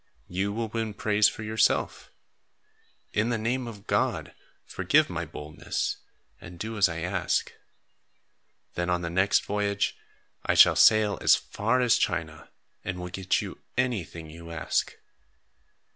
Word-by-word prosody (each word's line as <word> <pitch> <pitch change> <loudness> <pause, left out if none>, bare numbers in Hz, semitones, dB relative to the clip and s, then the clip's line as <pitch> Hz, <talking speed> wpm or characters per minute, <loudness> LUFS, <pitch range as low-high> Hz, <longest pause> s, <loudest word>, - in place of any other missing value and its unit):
You 95 +3 -1
will 115 +2 -2
win 110 -1 -3
praise 105 0 +3
for 110 - -8
yourself. 110 +1 0 1.0
In 110 +3 +1
the 120 - 0
name 120 +3 -1
of 105 -4 -10
God, - - 0 0.3
forgive - - +2
my - - -3
boldness, 75 +1 -4 0.4
and 85 +1 -11
do 110 +5 -5
as 100 -3 +4
I 85 0 -5
ask. 90 0 -1 1.2
Then, 85 0 -2
on 90 -1 0
the 85 - -3
next 95 +3 +2
voyage, 100 0 -1 0.5
I - - +1
shall - - +8
sail 110 -2 +5
as - - +6
far 115 +5 -1
as 125 -2 +4
China - - -2 0.3
and 90 - -4
will 90 0 -5
get 95 +1 0
you - - -8 0.2
anything 90 -11 -2
you 85 +1 -11
ask!" 80 -1 -1
100 Hz, 145 wpm, -27 LUFS, 90-110 Hz, 1.2 s, shall